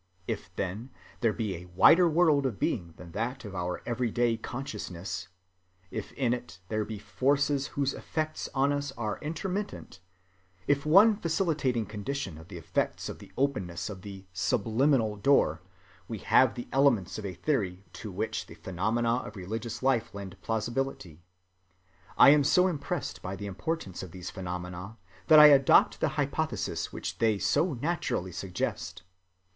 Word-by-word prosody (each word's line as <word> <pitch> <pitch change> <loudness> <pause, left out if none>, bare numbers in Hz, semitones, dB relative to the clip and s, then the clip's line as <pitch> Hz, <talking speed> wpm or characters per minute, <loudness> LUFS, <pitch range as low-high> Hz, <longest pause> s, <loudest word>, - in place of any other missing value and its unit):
If, - - -4
then, 100 +7 -3 0.3
there 115 -2 +2
be 105 -3 -3
a 90 +1 -11
wider 170 - +7
world 155 -4 +4
of 115 -6 -4
being 85 -2 -2
than 85 -2 -11
that 115 +6 -3
of 100 - -7
our 90 -1 -3
every‐day 120 -1 0
consciousness, 95 -9 -5 0.6
if - - -5
in 125 -3 +1
it 95 -7 -6
there 110 -1 0
be 110 0 -6
forces 140 +8 +1
whose 140 -1 +1
effects 155 -1 -3
on 140 +1 +3
us 145 -1 -2
are 110 -6 -3
intermittent, 180 - -4 0.7
if 145 +1 +1
one 205 +7 +7
facilitating 155 - 0
condition 105 - -4
of 80 - -13
the 100 - -8
effects 85 - -2
be - - -3
the - - -24
openness 105 -10 -1
of 95 -2 -9
the 95 -1 -9
"subliminal" 110 +3 +1
door, 140 +7 +3 0.5
we - - -4
have - - +4
the 120 - -6
elements 125 -9 +2
of 105 - -6
a 90 - -6
theory 100 -10 -1
to 105 - -7
which 105 +5 -3
the - - -11
phenomena 115 +6 0
of 110 -3 -7
religious 110 +5 -5
life 130 -6 +1
lend 95 -2 -7
plausibility. 115 - -3 1.0
I - - +9
am 145 -1 +5
so 180 +6 +4
impressed 165 -7 -3
by 95 +2 -4
the 100 +1 -7
importance 100 - -4
of 95 - -7
these 90 +1 -7
phenomena 90 +2 -6 0.3
that 155 - +8
I 150 0 +11
adopt 135 -1 +5
the - - +2
hypothesis - - -1
which - - -5
they 110 -2 +3
so 145 - +1
naturally 125 - -2
suggest. 90 -2 -4
115 Hz, 155 wpm, -29 LUFS, 95-140 Hz, 1.0 s, I